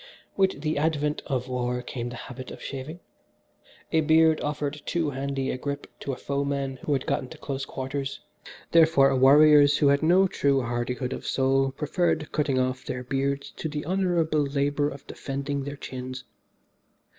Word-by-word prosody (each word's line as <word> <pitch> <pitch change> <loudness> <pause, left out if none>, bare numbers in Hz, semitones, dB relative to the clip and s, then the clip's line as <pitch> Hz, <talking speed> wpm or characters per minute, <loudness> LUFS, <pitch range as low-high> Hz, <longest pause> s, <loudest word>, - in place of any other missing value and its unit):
"With 190 -7 +1
the 155 -1 -1
advent 150 -1 0
of 130 -3 -2
war 125 -1 -2
came 120 -1 -5
the 120 - -7
habit 130 +2 -8
of - - -9
shaving. 145 +6 -7 0.9
A 160 - +3
beard 160 0 +4
offered 145 0 -3
too 165 -4 0
handy 135 0 -2
a 130 - -4
grip 140 +1 -4
to 140 - -4
a - - -3
foeman 140 -1 -2
who 145 - -2
had 135 - -1
gotten 130 - -1
to - - -11
close 135 -1 -4
quarters, 135 +1 -4 0.5
therefore, 160 -5 +5
warriors 145 +2 +7
who 145 - +4
had 140 0 +3
no 180 +4 +5
true 140 -6 +1
hardihood 120 +2 -2
of - - -7
soul 135 0 +2
preferred 155 +1 -1
cutting 145 -3 0
off 130 0 0
their 125 -1 -4
beards 140 +2 -2
to 160 - -3
the 150 0 -4
honourable 175 -4 +1
labour 145 +1 0
of 140 -1 -10
defending 140 0 -4
their 145 0 -6
chins. 130 -1 -7
140 Hz, 170 wpm, -26 LUFS, 130-150 Hz, 0.9 s, warriors